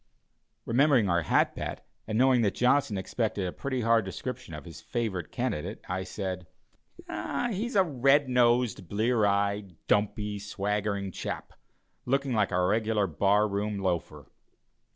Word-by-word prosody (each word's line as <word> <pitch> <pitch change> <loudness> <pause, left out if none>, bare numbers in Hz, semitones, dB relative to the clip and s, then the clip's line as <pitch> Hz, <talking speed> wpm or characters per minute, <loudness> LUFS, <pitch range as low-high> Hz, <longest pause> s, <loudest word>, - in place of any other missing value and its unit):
Remembering 130 -2 +4
our 85 0 +3
hat 80 - +2
bet, - - -5 0.2
and 110 0 -1
knowing 130 0 +5
that 105 -3 +1
Johnson 125 -4 +2
expected 105 0 -2
a 90 - -2
pretty 130 -3 -3
hard 115 0 +3
description 95 -1 -6
of - - -9
his - - -10
favorite 100 -8 -3
candidate, 120 -11 -3
I 95 +1 -3
said: 95 -2 -5 0.6
"He 190 - -2
is 240 - -7
a 195 - +6
red 140 -2 +3
nosed, 120 -6 +2
blear 110 +1 +2
eyed, 100 -2 0
dumpy, 105 0 0
swaggering 100 -1 -2
chap, - - -5 0.5
looking 135 0 +1
like 105 -3 +2
a 90 -1 +2
regular 110 +1 +1
bar 100 +5 +2
room 100 +1 -2
loafer." 95 -3 -2
105 Hz, 145 wpm, -28 LUFS, 100-125 Hz, 0.6 s, a